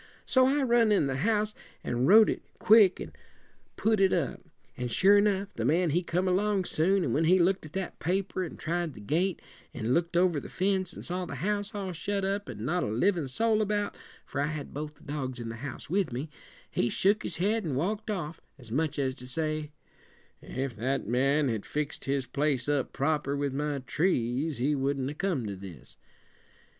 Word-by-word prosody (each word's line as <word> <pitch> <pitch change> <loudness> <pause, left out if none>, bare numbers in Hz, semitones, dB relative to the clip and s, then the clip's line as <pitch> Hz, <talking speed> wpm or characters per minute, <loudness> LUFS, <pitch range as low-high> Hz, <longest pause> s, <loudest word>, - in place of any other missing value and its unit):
So 260 -1 +4
I 280 +1 +2
run 235 -3 +4
in 200 -8 +4
the 135 -1 -1
house, 210 +5 +1 0.3
and 120 +2 0
wrote 215 +4 +8
it - - -1 0.2
quick 210 -3 +6
and - - -8 0.6
put 220 -1 +2
it 190 -1 +4
up. - - -1 0.3
And 125 -1 -4
sure 195 - +5
enough, 200 -1 +1
the 115 - -3
man 165 +6 +2
he 175 +4 +2
come 180 +1 -1
along 195 +1 +1
soon, 185 +5 +2
and 120 - -1
when 160 +3 +2
he 180 +3 +5
looked 185 -1 +2
at 155 - -18
that 190 -1 -4
paper 185 +1 -1
an' 170 - -7
tried 170 -1 -2
the - - -10
gate, 170 - 0 0.4
an' 120 0 -1
looked 170 +2 +1
over 175 -4 +3
the - - -9
fence 190 -1 0
an' - - -8
saw 180 +1 -3
the 140 - -6
house 210 +1 -1
all 195 -3 -3
shut 200 +4 -2
up 200 -4 -2
an' 110 -2 -6
not 175 +6 0
a - - -1
livin' 155 - +1
soul 220 - +1
about 205 0 -1 0.3
for - - -3
I 145 - +1
had 155 -2 -5
both 150 +1 -5
the 155 - -21
dogs 135 -4 -4
in 115 -1 -5
the 115 - -6
house 135 +1 -7
with 185 -1 0
me 135 +6 -4 0.4
he 120 - +1
shook 205 - +2
his 175 - -3
head 210 +5 +1
an' 150 -6 -2
walked 205 +10 -2
off, 170 -6 -4 0.2
as 120 -5 -14
much 150 +4 0
as 135 -2 0
to 125 -1 -11
say, 155 +2 -2 0.7
'If 130 -2 -4
that 130 +5 -1
man 135 +5 +2
had 110 -4 -2
fixed 150 0 -4
his 135 -1 0
place 140 0 0
up 145 -3 0
proper 140 -1 0
with 140 -1 -1
my 145 +1 -1
trees 140 -2 0
he 135 +5 +1
wouldn't 135 -1 -1
a - - -6
come 160 - -1
to 100 -2 -4
this!' 90 -8 -10
160 Hz, 210 wpm, -29 LUFS, 135-195 Hz, 0.7 s, wrote